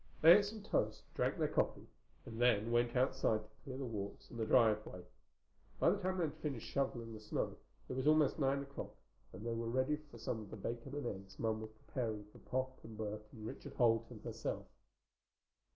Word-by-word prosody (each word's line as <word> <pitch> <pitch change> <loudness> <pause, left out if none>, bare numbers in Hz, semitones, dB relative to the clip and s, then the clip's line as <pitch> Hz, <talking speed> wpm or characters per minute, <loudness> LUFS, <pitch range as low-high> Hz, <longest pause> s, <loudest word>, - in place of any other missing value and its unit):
They 165 +2 +12
ate 200 - 0
some 210 0 -6
toast, - - 0
drank - - +1
their - - +2
coffee, - - 0 0.4
and 115 0 -5
then 115 -2 +4
went 120 +1 +3
outside 125 -4 +2
to 105 - -18
clear 130 -2 -6
the 135 - -3
walks 100 -4 -5
and 115 - -7
the 110 - 0
driveway. 110 -7 +3 0.8
By 170 - +6
the 200 - 0
time 185 -1 0
they 175 - +2
had 150 -3 0
finished 145 -7 -3
shoveling 120 -4 -1
the 110 - -7
snow 105 - -2 0.3
it - - -4
was 130 +3 0
almost 155 -1 +5
nine 140 0 +2
o'clock 140 0 -7 0.4
and 95 +5 -8
they 115 - 0
were 115 0 -2
ready 130 +5 +2
for 120 - -11
some 115 0 -2
of 105 -2 -8
the - - -7
bacon 120 +6 -4
and 145 - -3
eggs 95 -3 -5
Mom 110 -1 0
was 110 - -6 0.2
preparing 110 -5 -2
for - - -15
Pop 130 0 -2
and 110 -1 -9
Bert 105 0 -4
and 110 -1 -9
Richard - - -7
Holt 115 -2 +4
and - - -10
herself. - - -3
120 Hz, 210 wpm, -37 LUFS, 110-135 Hz, 0.8 s, They